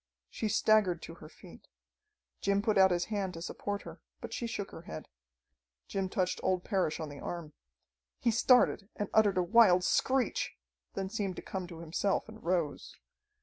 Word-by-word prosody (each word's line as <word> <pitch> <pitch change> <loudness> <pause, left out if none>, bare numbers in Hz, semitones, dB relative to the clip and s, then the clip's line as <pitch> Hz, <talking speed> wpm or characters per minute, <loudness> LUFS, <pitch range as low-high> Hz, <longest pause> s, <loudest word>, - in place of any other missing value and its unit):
She 220 - -2
staggered 205 -5 +3
to 165 - -8
her 155 -2 -12
feet. - - -15 0.7
Jim 200 0 +1
put 215 -2 +2
out 190 -1 +7
his 175 -1 0
hand 190 -3 -2
to 165 - -7
support 205 +2 -4
her, - - -10 0.2
but - - -7
she 235 - -2
shook 205 -3 -4
her - - -9
head. 170 -3 -8 0.8
Jim 195 -1 -2
touched 185 -1 -1
old 185 -1 0
Parrish 190 -7 0
on 160 - -4
the 145 -1 -9
arm. 170 -4 -6 0.6
He 235 - +1
started 225 -3 +4
and 205 - -3
uttered 205 -3 +4
a 180 - +3
wild 185 -2 +6
screech; 265 +6 +1 0.4
then 190 -1 -2
seemed 200 -4 -2
to - - -8
come 190 -2 -5
to 165 -2 -9
himself 170 +6 -1
and 220 0 -12
rose. 170 -4 -1
190 Hz, 180 wpm, -31 LUFS, 175-210 Hz, 0.8 s, out